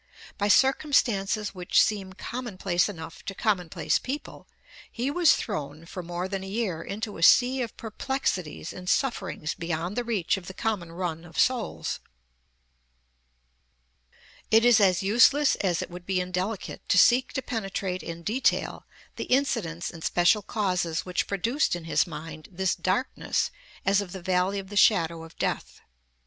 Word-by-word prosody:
By 205 - +1
circumstances 220 -6 +2
which 180 -2 +1
seem 195 -3 +1
commonplace 195 -5 -1
enough 165 -4 -9
to 195 - -5
commonplace 185 -7 0
people, 280 +3 -6 0.4
he 250 +4 -2
was 340 0 +5
thrown 150 +2 -5
for 180 +2 -7
more 175 +1 -4
than 195 0 -4
a - - -7
year 195 -5 -2
into 210 +1 -5
a - - -7
sea 255 +8 +6
of 235 - -5
perplexities 215 - -3
and 180 0 -6
sufferings 240 - -1
beyond 170 +3 -3
the 245 - 0
reach 215 -7 0
of 180 -2 -10
the 190 - -8
common 205 -8 -2
run 170 -2 -4
of 165 -1 -13
souls. 255 -3 0 2.5
It 225 +1 +5
is 240 -2 +7
as 190 -2 +3
useless 245 +8 +5
as 180 -4 0
it - - -10
would 175 0 -10
be 190 -1 +1
indelicate 185 +3 -3
to - - +4
seek 245 +7 +5
to 265 - -2
penetrate 195 -5 -3
in 170 0 -7
detail 235 +9 0 0.3
the - - -3
incidents 230 -11 0
and 165 -2 -11
special 180 +5 +3
causes 180 -6 -1
which 180 -1 -1
produced 225 - 0
in 175 - -7
his 165 - +1
mind 155 -1 -8
this 190 +1 0
darkness 185 +9 -1 0.3
as 195 +1 +4
of 185 -3 -7
the 190 - -7
valley 185 +2 +1
of 195 -1 -6
the 205 - -8
shadow 170 -6 +4
of 165 0 -13
death. - - -3
190 Hz, 160 wpm, -27 LUFS, 175-225 Hz, 2.5 s, is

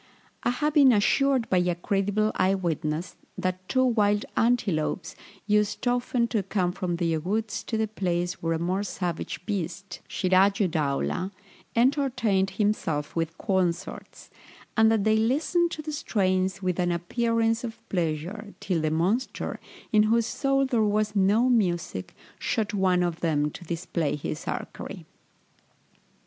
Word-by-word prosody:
I - - +1
have 295 +5 0
been 280 -4 +7
assured 260 +4 +3
by 185 - +3
a 180 -1 +1
credible 205 +4 0
eye 190 +1 +2
witness, 165 -2 -2 0.2
that 185 0 -3
two 260 -1 +3
wild 210 -4 +2
antelopes 200 -8 0 0.3
used 210 +3 +1
often 245 -1 +1
to 220 - +1
come 190 -2 0
from 180 -1 -2
their 165 -2 0
woods 215 +7 -2
to 225 - -2
the 220 0 +1
place 180 -3 -2
where 165 0 0
a - - 0
more 180 +4 -1
savage 180 -3 -4
beast, 195 -1 -4
Sirájuddaulah, 185 -3 +1 0.5
entertained 235 -6 +2
himself 190 -7 -1
with 165 -1 -2
concerts, 185 -2 -2 0.4
and 220 0 +5
that 220 -3 +2
they 220 +1 +3
listened 305 +10 +2
to 310 - -6
the 305 0 -5
strains 190 - 0
with 185 -1 -1
an 175 -1 +2
appearance 230 +6 0
of 230 -2 -6
pleasure, 180 +5 -3
till 175 -4 -1
the 155 - +1
monster, 185 +11 -1 0.3
in 215 -2 +5
whose 230 0 +3
soul 275 +2 +1
there 245 -4 +1
was 210 0 +1
no 205 +5 +4
music, 175 - 0 0.2
shot 215 -2 -1
one 185 -3 +2
of 175 -1 -2
them 150 -3 +1
to - - -10
display 165 -3 -2
his 150 +1 -5
archery. - - -5
195 Hz, 145 wpm, -26 LUFS, 175-225 Hz, 0.5 s, been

